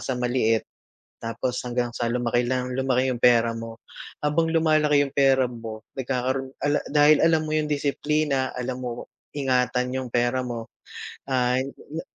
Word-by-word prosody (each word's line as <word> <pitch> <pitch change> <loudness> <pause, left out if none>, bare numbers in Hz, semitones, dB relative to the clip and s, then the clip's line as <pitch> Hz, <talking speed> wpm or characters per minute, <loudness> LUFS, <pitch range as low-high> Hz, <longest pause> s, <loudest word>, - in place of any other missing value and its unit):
sa 130 - -2
maliit, 120 -3 +1 0.6
tapos 115 +2 -3
hanggang 120 -1 -2
sa 120 0 -2
lumaki 120 0 0
lang 125 0 -1
lumaki 130 0 +1
'yong 120 - -6
pera 115 -1 +5
mo, 115 0 -7 0.5
habang 160 +2 +2
lumalaki 155 -3 +3
'yong 140 - -8
pera 135 -2 +4
mo. 115 -2 -7
nagkakaroon 130 +1 -2
ka - - -3
la - - +2
dahil 150 +1 +5
alam 160 -1 +3
mo 155 - -4
'yong 155 -1 0
disiplina, 145 -1 0
alam 125 0 -4
mo 120 -1 -5 0.3
ingatan 125 -2 +1
'yong 130 -1 -3
pera 120 +2 +1
mo, 120 -3 -6 0.5
ah, 125 -1 +1
na 130 - -1 0.3
na - - -3
130 Hz, 165 wpm, -24 LUFS, 120-140 Hz, 0.6 s, pera